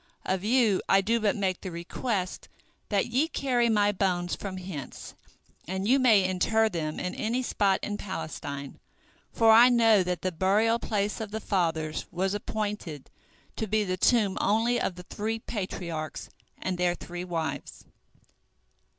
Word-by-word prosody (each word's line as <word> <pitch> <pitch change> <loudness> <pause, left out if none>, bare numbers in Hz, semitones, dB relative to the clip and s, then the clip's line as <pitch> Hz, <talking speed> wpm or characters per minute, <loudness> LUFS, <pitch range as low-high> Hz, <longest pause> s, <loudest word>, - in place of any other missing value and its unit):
Of 190 0 -1
you 220 -3 +3
I 195 - +5
do 230 +4 +1
but 210 -2 +1
make 190 -3 -1
the 190 - -5
request 180 +3 -3 0.4
that 200 -2 +2
ye 260 +7 +1
carry 250 -6 +1
my 205 -2 +3
bones 180 -3 0
from 190 -2 -6
hence, 180 -8 -7 0.5
and 190 +2 -2
you 265 +4 +5
may 225 -7 +5
inter 220 +4 +2
them 155 -5 -3
in 180 - -3
any 240 +4 -1
spot 200 -5 +1
in 205 -1 -3
Palestine, 145 -8 -6 0.5
for 225 -1 +5
I 235 +3 +8
know 225 -4 +5
that 180 -1 -2
the 185 - 0
burial 210 +7 +2
place 210 -1 -1
of 220 - -4
the 220 +1 -4
fathers 160 -7 -1
was 190 +2 -1
appointed 205 -8 -4 0.5
to 220 - -2
be 215 +1 +1
the 185 -2 -1
tomb 205 0 +2
only 230 +3 +2
of 180 - -1
the 180 - -9
three 220 +4 -3
Patriarchs 180 -8 -5 0.3
and 185 -1 -3
their 175 -1 +2
three 175 0 -7
wives." 165 -3 -4
195 Hz, 160 wpm, -28 LUFS, 180-220 Hz, 0.5 s, I